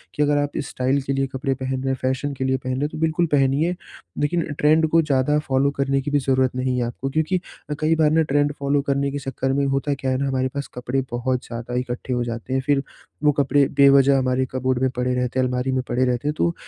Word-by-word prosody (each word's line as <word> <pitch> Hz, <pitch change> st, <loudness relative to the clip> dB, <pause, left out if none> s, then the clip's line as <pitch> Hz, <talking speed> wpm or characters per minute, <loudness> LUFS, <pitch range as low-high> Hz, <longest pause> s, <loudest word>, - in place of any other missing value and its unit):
कि 150 Hz, -, -1 dB
अगर 145 Hz, 0 st, +2 dB
आप 145 Hz, 0 st, -1 dB
स्टाइल 130 Hz, +1 st, -1 dB
के 135 Hz, +1 st, -2 dB
लिए 135 Hz, 0 st, 0 dB
कपड़े 135 Hz, +1 st, -2 dB
पहन 130 Hz, 0 st, -3 dB
रहे 135 Hz, -, -3 dB
हैं, -, -, 0 dB
फैशन 130 Hz, +2 st, -1 dB
के 130 Hz, -, -4 dB
लिए 130 Hz, 0 st, +1 dB
पहन 130 Hz, 0 st, -5 dB
रहे 130 Hz, -, -2 dB
हैं, 145 Hz, -, +1 dB
तो -, -, -8 dB
बिल्कुल 160 Hz, +2 st, +1 dB
पहनिए, 145 Hz, +5 st, +2 dB, 0.5 s
लेकिन 170 Hz, +4 st, +1 dB, 0.2 s
ट्रेंड 155 Hz, +2 st, +4 dB
को 165 Hz, +1 st, +4 dB
ज़्यादा 150 Hz, -1 st, +1 dB
फ़ॉलो 135 Hz, +1 st, +2 dB
करने 135 Hz, 0 st, +1 dB
की 145 Hz, +2 st, -4 dB
भी 145 Hz, -, +3 dB
ज़रूरत 130 Hz, -1 st, +1 dB
नहीं 130 Hz, 0 st, 0 dB
है 125 Hz, -, +1 dB
आपको, 130 Hz, +3 st, -4 dB
क्योंकि 160 Hz, +5 st, 0 dB, 0.3 s
अ, 150 Hz, -, -1 dB
कई 155 Hz, +1 st, +2 dB
बार 155 Hz, -1 st, +3 dB
ना 160 Hz, +1 st, +4 dB
ट्रेंड 145 Hz, +1 st, +2 dB
फ़ॉलो 140 Hz, 0 st, +1 dB
करने 140 Hz, 0 st, +1 dB
के 145 Hz, -, -3 dB
चक्कर 135 Hz, 0 st, -2 dB
में 140 Hz, +1 st, +1 dB
होता 135 Hz, +1 st, 0 dB
क्या 135 Hz, -1 st, -2 dB
है 130 Hz, -, +1 dB
ना, 140 Hz, +1 st, -1 dB
हमारे 130 Hz, -1 st, 0 dB
पास 140 Hz, 0 st, -4 dB
कपड़े 125 Hz, +2 st, -2 dB
बहुत 125 Hz, +1 st, -1 dB
ज़्यादा 120 Hz, +1 st, -6 dB
इकट्ठे 125 Hz, 0 st, -4 dB
हो 120 Hz, -1 st, 0 dB
जाते 115 Hz, +2 st, -5 dB
हैं, 130 Hz, -, +1 dB
फिर 140 Hz, -2 st, +2 dB, 0.4 s
वो 150 Hz, -, +5 dB
कपड़े 140 Hz, 0 st, +2 dB
बेवजह 140 Hz, 0 st, +6 dB
हमारे 130 Hz, 0 st, +1 dB
कपबोर्ड 130 Hz, -1 st, 0 dB
में 130 Hz, -, +3 dB
पड़े 125 Hz, 0 st, 0 dB
रहते 125 Hz, +1 st, -1 dB
हैं, 130 Hz, -, +3 dB
अलमारी 125 Hz, +1 st, -1 dB
में 130 Hz, -, 0 dB
पड़े 130 Hz, +1 st, +1 dB
रहते 125 Hz, +2 st, -1 dB
हैं। 150 Hz, -, +1 dB
तो, 170 Hz, -, +1 dB
135 Hz, 255 wpm, -22 LUFS, 130-145 Hz, 0.5 s, बेवजह